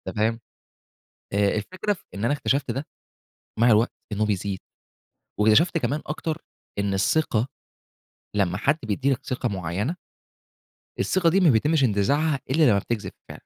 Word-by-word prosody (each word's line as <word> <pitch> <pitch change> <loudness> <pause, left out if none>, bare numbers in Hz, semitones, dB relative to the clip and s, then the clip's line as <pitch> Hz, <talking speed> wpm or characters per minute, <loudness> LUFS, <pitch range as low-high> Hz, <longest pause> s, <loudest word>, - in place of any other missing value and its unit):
تمام؟ 115 +2 +1 0.9
أ 100 0 +3
الفكرة 185 - -2
في 180 - -15
إن 105 +4 -2
أنا 145 - +2
اكتشفت 140 -3 0
ده 135 +5 -4 0.7
مع 120 +1 +5
الوقت 110 +3 +4 0.2
إنه 105 +1 0
بيزيد، 100 -2 -2 0.8
واكتشفت 110 +12 +4
كمان 150 -1 -1
أكتر 160 +1 -3 0.4
إن 100 -1 0
الثقة 115 +3 +1 0.9
لمّا 90 -3 +1
حد 140 +7 +2
بيدّي 130 +6 0
لك 125 - -3
ثقة 125 -1 -1
معيّنة 100 - -2 1.0
الثقة 180 -3 +2
دي 190 +4 +3
ما 175 -5 +5
بيتمّش 140 +5 +3
انتزاعها 140 +7 +2
إلّا 155 +4 +3
لمّا 100 -1 +4
بتكذب 110 +1 -4 0.2
فع - - -8
120 Hz, 145 wpm, -25 LUFS, 105-155 Hz, 1.0 s, مع